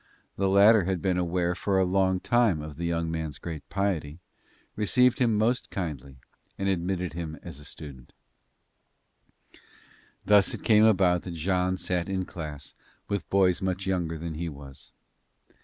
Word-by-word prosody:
The 95 0 0
latter 100 +1 +6
had 95 -1 -1
been 90 0 0
aware 90 0 0
for 95 +2 -1
a 95 - +3
long 95 0 +1
time 115 -6 +2
of 75 -2 -9
the 85 0 -2
young 85 -1 -1
man's 80 -3 -4
great 80 -3 -8
piety, 90 -6 -2 0.6
received 125 +4 +3
him 115 -4 +2
most 115 +4 +1
kindly 70 -7 -5 0.4
and 95 - -2
admitted 90 -2 -1
him 80 -2 -5
as 70 - -8
a 75 - -12
student. 70 -5 -11 2.1
Thus 105 -2 +4
it - - -11
came 110 -1 +5
about 90 -5 +4
that 90 -2 -7
Jean 90 +2 0
sat 90 -1 -2
in 95 -1 -1
class 75 -6 -8 0.4
with 100 -1 -3
boys 95 -2 +3
much 95 0 -2
younger 85 -4 -1
than 85 +1 -5
he 85 +2 -4
was. 70 -2 -11
90 Hz, 155 wpm, -27 LUFS, 80-95 Hz, 2.1 s, latter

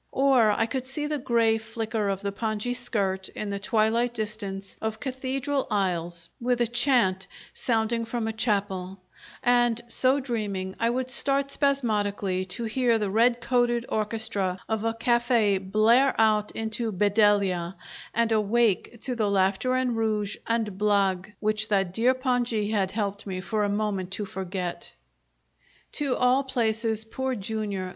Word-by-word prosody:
Or 265 -5 +4
I 215 +2 +2
could 255 +3 -4
see 295 +3 -3
the 300 -1 -2
grey 230 -3 +2
flicker 220 -1 -3
of 195 -1 -2
the 200 - -1
pongee 215 +3 -2
skirt 190 -5 -2
in 210 -1 -5
the 200 - -3
twilight 230 +2 +1
distance 205 -3 -5
of 220 0 -3
cathedral 265 +1 -2
aisles 175 -4 -1
with 245 0 +1
a 240 - +3
chant 240 -6 +2 0.3
sounding 230 0 0
from 230 -1 -2
a 225 - -2
chapel; 195 -4 -1 0.5
and, 240 -1 +3
so 260 +3 +2
dreaming, 205 -7 -3
I 230 - +2
would 255 +1 -2
start 275 +2 0
spasmodically, 205 -10 0
to 210 +6 -5
hear 235 +1 +2
the 205 -3 -2
red 235 +3 +3
coated 240 -1 +1
orchestra 210 -4 -1
of 220 -1 -1
a 225 0 0
cafe' 235 -4 +2
blare 220 +8 +3
out 215 -1 +3
into 225 +1 -3
"Bedelia," 200 -3 +2 0.4
and 230 0 +1
awake 220 +1 +1
to 260 - -1
the 215 -3 +1
laughter 200 +6 +2
and 255 -2 +1
rouge 215 -2 -1
and 220 -4 -1
blague 200 -2 +1
which 215 0 0
that 195 -4 +1
dear 245 +5 +3
pongee 245 -5 0
had 195 -3 +1
helped 205 0 -3
me 185 -1 -3
for 210 +3 -1
a 205 - +1
moment 200 -3 -1
to 210 - -3
forget! 185 -2 -5 1.0
To 280 -4 0
all 250 +2 +3
places, 225 -4 0
Poor 260 +3 -2
Jr. 200 -3 -3
220 Hz, 150 wpm, -26 LUFS, 200-240 Hz, 1.0 s, Or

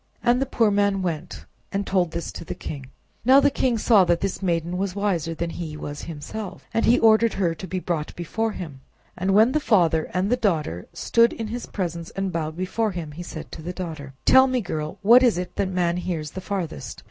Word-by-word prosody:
And 245 +2 +3
the 270 - 0
poor 230 -4 +2
man 200 -1 +2
went 165 -4 -4 0.3
and 200 0 -1
told 185 -3 +1
this 170 +1 -4
to - - -8
the - - -6
king. 135 -4 -7 0.4
Now 260 +4 +7
the 285 0 +4
king 250 -3 +1
saw 215 -3 +5
that 175 -1 +1
this 195 -1 -2
maiden 175 -1 -1
was 195 -1 -2
wiser 175 -6 -1
that 170 +1 -3
he 160 -3 -6
was 145 -1 -6
himself, 185 +5 -7
and 225 - +2
he 240 - +5
ordered 225 0 +5
her 175 -4 +1
to 165 +3 -8
be 185 - -3
brought 170 -4 -3
before 220 +6 -2
him. 145 -9 -8 0.3
And 190 +2 0
when 220 +4 +6
the 305 - +2
father 170 - +2
and 185 +1 0
daughter 155 - 0
stood 230 0 +3
in 225 -2 -5
his 240 +2 -5
presence 170 -4 -4
and 195 -1 -2
bowed 160 -1 -3
before 200 +3 -1
him, 165 -4 -5
he 155 +4 -8
said 170 -2 -8
to - - -8
the 175 +3 -5
daughter— 155 -7 -7
"Tell 260 0 +7
me, 255 -1 +1
girl, 155 -4 -4
what 235 +5 +8
is 240 -7 +4
it 180 0 -5
that 190 - 0
man 175 -2 0
hears 165 -5 -3
the 190 - -6
farthest?" 185 - -4
185 Hz, 220 wpm, -24 LUFS, 165-215 Hz, 0.4 s, what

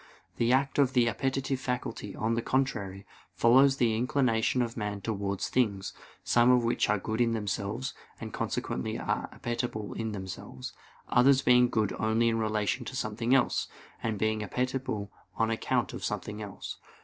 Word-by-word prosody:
The 115 +1 +2
act 135 +2 +2
of 135 -2 +4
the 120 -3 +4
appetitive 135 +2 -1
faculty, 125 -5 -4
on 110 +1 0
the 115 - 0
contrary, 105 -8 -1 0.3
follows 135 +4 +5
the 115 -4 +2
inclination 125 0 +2
of 115 -1 -4
man 105 -2 -3
towards 100 -1 -2
things; 105 -6 0 0.3
some 120 +1 +4
of 125 -1 +5
which 115 -2 +1
are 105 - +3
good 110 +4 -2
in 115 -1 +3
themselves, 110 +4 -2 0.3
and - - -7
consequently 65 - -2
are - - -2
appetible 120 -3 -3
in 110 -1 -3
themselves; 95 -9 -7 0.4
others 135 +2 +5
being 125 0 +5
good 110 -4 0
only 110 +2 +2
in 115 0 0
relation 110 +2 0
to 130 - -6
something 115 0 +1
else, 135 - +2 0.3
and 110 -2 -1
being 110 +1 +1
appetible 125 -2 -2 0.2
on 115 0 +1
account 115 - 0
of - - -6
something 105 +1 -3
else. 100 -2 -7
115 Hz, 160 wpm, -29 LUFS, 105-125 Hz, 0.4 s, follows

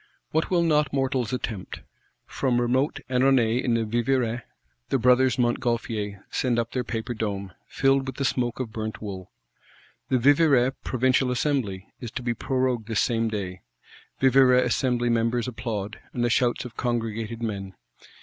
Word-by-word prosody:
What 160 +1 0
will 175 -2 +3
not 150 -3 +2
mortals 130 -4 0
attempt? 110 -6 -4 0.4
From 125 -3 0
remote 130 +4 +1
Annonay 125 -2 +3
in 120 -2 +1
the 115 -1 0
Vivarais, 120 +1 0 0.5
the - - +2
Brothers 125 0 +4
Montgolfier 115 -4 -1
send 125 -4 0
up 115 0 -1
their 125 -1 -1
paper 115 +1 -4
dome, 100 -4 -3 0.2
filled 135 0 +2
with 130 - -4
the 140 - -2
smoke 120 -1 -1
of 125 -4 -3
burnt 110 -1 -4
wool. 95 -4 -7 0.8
The 130 - +3
Vivarais 140 -1 +4
provincial 130 +1 +2
assembly 125 -7 -1
is 120 - -6
to 125 - -4
be 120 -1 0
prorogued 130 -3 -1
this 110 -3 0
same 115 +1 +1
day: 95 -4 -4 0.6
Vivarais 130 -1 +5
Assembly 120 0 +1
members 115 +1 +1
applaud, 110 -4 -4
and 120 -1 0
the 120 - +1
shouts 120 +1 +1
of 120 - -9
congregated 115 -1 -2
men. 100 -4 -4
120 Hz, 155 wpm, -25 LUFS, 115-130 Hz, 0.8 s, Vivarais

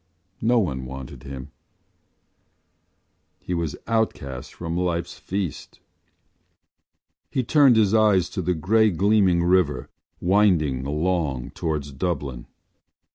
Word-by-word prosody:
No 120 +2 +3
one 65 - -1
wanted 65 0 -8
him; 65 -1 -8 1.9
he 90 - -5
was 85 -4 -2
outcast 70 - -2
from 85 -1 -5
life’s 85 -1 -2
feast. 95 -5 -5 1.5
He 130 - -1
turned 140 0 +5
his 105 -2 +3
eyes 105 -5 +4
to - - -3
the 90 +1 0
grey 110 +7 +3
gleaming 95 -1 +3
river, 85 -8 +1 0.3
winding 85 -9 +2
along 75 -4 -1
towards 75 -3 -3
Dublin. 70 -4 -3
85 Hz, 105 wpm, -24 LUFS, 70-100 Hz, 1.9 s, turned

